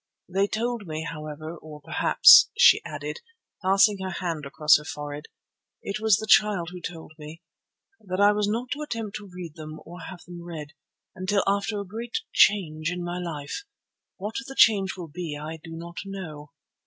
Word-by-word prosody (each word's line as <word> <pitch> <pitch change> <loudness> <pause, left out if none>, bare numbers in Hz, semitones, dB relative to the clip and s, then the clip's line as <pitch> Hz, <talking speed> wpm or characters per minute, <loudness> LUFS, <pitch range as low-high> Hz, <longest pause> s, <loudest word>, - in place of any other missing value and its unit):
They 195 +2 +1
told 230 -1 -3
me, 155 0 -4
however, 155 +1 -7
or 155 -2 -11
perhaps," 145 - +7
she - - +7
added, - - -6 0.4
passing 195 +1 +4
her 190 0 -4
hand 170 -5 -4
across 150 +2 +5
her - - -11
forehead, 145 0 -7 0.6
"it 200 - -4
was 220 -2 +4
the 220 - -5
Child 205 -5 +4
who 180 -1 -9
told 165 -2 -8
me, 155 +3 -10 0.6
that 185 -2 -5
I 205 0 +6
was 210 0 0
not 240 +4 -3
to 295 - -3
attempt 225 -8 -4
to 205 -2 -12
read 175 -3 -8
them 155 -1 -9
or 175 +2 -10
have 175 +1 -9
them 175 -1 -10
read, 160 -3 -8 0.4
until 185 +2 0
after 200 +1 0
a 200 - -5
great 230 +5 -5 0.2
change 160 -6 +3
in 180 0 -4
my 175 +1 -4
life. 160 - -5 0.5
What 210 +3 -5
the 270 - -8
change 195 -4 +4
will 175 -2 -6
be 160 -1 -5
I 155 +2 -6
do 165 -1 -9
not 170 +1 -9
know." 165 -7 -8
180 Hz, 180 wpm, -26 LUFS, 155-205 Hz, 0.6 s, perhaps